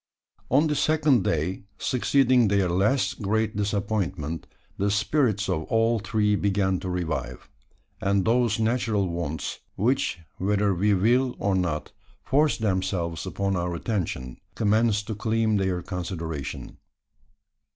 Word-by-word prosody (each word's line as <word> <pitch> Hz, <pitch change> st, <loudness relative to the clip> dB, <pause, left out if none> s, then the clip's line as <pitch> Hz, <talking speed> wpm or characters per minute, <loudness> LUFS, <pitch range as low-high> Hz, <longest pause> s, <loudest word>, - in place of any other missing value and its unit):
On 140 Hz, +5 st, +4 dB
the 150 Hz, -, +1 dB
second 150 Hz, -5 st, +3 dB
clay 85 Hz, +2 st, -1 dB, 0.2 s
succeeding 125 Hz, -1 st, +3 dB
their 100 Hz, -2 st, +2 dB
last 100 Hz, +10 st, +1 dB
great 110 Hz, +2 st, 0 dB
disappointment, 100 Hz, -6 st, -2 dB, 0.3 s
the 100 Hz, +1 st, +2 dB
spirits 105 Hz, 0 st, +1 dB
of 80 Hz, 0 st, -1 dB
all 115 Hz, 0 st, +2 dB
three 105 Hz, 0 st, +1 dB
began 95 Hz, -2 st, +1 dB
to 95 Hz, -, -5 dB
revive; 80 Hz, -8 st, -3 dB, 0.5 s
and 100 Hz, -1 st, +1 dB
those 115 Hz, -1 st, +2 dB
natural 110 Hz, -3 st, +1 dB
wants 85 Hz, -4 st, -4 dB, 0.2 s
which, 125 Hz, +2 st, +1 dB, 0.2 s
whether 100 Hz, +1 st, +1 dB
we 100 Hz, +3 st, +2 dB
will 120 Hz, +6 st, +2 dB
or 100 Hz, -, 0 dB
not, 85 Hz, -5 st, -1 dB, 0.3 s
force 145 Hz, +2 st, +2 dB
themselves 95 Hz, -6 st, -1 dB
upon 100 Hz, -1 st, -1 dB
our 90 Hz, 0 st, -2 dB
attention 85 Hz, -, -3 dB, 0.2 s
commenced 105 Hz, -1 st, +2 dB
to 110 Hz, -, -4 dB
claim 110 Hz, 0 st, +1 dB
their 95 Hz, -2 st, -1 dB
consideration. 85 Hz, -6 st, -5 dB
100 Hz, 125 wpm, -25 LUFS, 90-115 Hz, 0.5 s, On